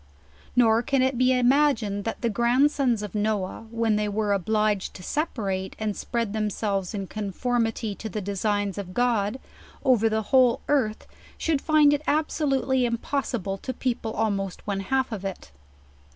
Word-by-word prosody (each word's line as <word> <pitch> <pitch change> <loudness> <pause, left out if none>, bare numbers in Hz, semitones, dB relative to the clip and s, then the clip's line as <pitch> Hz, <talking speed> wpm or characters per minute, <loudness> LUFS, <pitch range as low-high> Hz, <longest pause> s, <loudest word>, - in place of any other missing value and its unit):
Nor 230 -2 +5
can 270 0 +1
it 260 0 +1
be 255 +1 +3
imagined 250 -5 +2
that 225 - -4
the 235 - +1
grandsons 245 +1 +2
of 205 - -6
Noah, 210 0 -2
when 225 -2 +1
they 210 0 0
were 205 0 0
obliged 210 +1 0
to 180 - -9
separate, 195 - -2
and 215 -2 -2
spread 230 -3 -2
them 215 -1 0
selves 200 -2 -2
in 195 -1 -3
conformity 225 +2 -2
to 220 +2 -7
the 215 - -4
designs 205 0 -1
of 185 -2 -7
God, 240 -1 +1 0.5
over 235 -4 +4
the 220 0 0
whole 255 -3 +5
earth, 250 -7 0 0.3
should 310 -4 0
find 305 -2 +5
it 290 - 0
absolutely 275 -4 +1
impossible 235 -4 -2
to 260 - -4
people 235 -3 -2
almost 200 -4 -2
one 200 -2 -2
half 260 +6 0
of 205 -3 -5
it. 190 - -6
220 Hz, 160 wpm, -25 LUFS, 205-255 Hz, 0.5 s, Nor